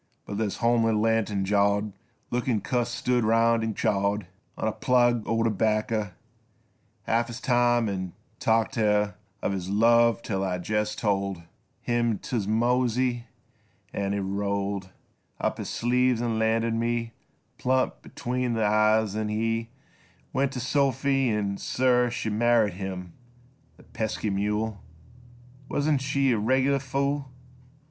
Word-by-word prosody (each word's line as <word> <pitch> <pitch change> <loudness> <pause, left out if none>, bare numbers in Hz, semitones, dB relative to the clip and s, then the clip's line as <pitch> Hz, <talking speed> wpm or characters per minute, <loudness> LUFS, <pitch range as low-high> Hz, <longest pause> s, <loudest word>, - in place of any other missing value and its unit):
But 100 0 -5
this 105 -3 -1
homely, 115 -1 +2
lantern 105 -2 +1
jawed 100 +1 +2 0.4
Lookin' 120 -2 0
cuss 120 +3 -1
stood 125 0 0
'round 115 +1 +3
'n' 110 -2 -2
chawed 100 0 0 0.3
On - - -1
a - - +1
plug 120 0 +2
o' 115 0 +1
terbacker 110 -1 0 0.9
Half 115 +1 +1
his 120 +1 -7
time 120 -2 +2
'n' 95 -3 -4 0.3
talked 115 +2 +2
t' 120 - -1
her 105 -1 +2 0.3
Of - - 0
his 95 -2 -4
love 115 +2 +4
till 95 -3 -2
I 90 -2 -1
jest 105 +3 -2
told 100 -4 -1 0.4
Him 120 -2 0
t' 110 -3 -3
mosey 120 +2 +1 0.7
an' 100 0 -1
he 100 - -1
rolled 100 0 -2 0.5
Up - - -1
his - - -4
sleeves 125 0 +1
'n' 115 -2 -1
landed 115 +1 +1
me 115 0 -1 0.5
Plumb 130 +1 +2
betwixt 125 -1 -3
th' - - -2
e3^es, 110 0 +3
then 110 0 -2
he 115 +1 -1 0.6
Went 140 0 +1
to 125 - -4
Sophy 135 0 +1
an' 100 -2 -1
sir, 125 -1 +2
she 115 -2 -3
Married 115 -2 +3
him! 90 -2 -6 0.6
The - - -17
pesky 110 -1 -3
mule! 105 +1 -1 0.9
Wuzn't 145 -1 +1
she 135 -1 +1
a 115 - +1
reg'ler 130 +5 +2
fool 140 +1 -2
115 Hz, 140 wpm, -26 LUFS, 105-120 Hz, 0.9 s, love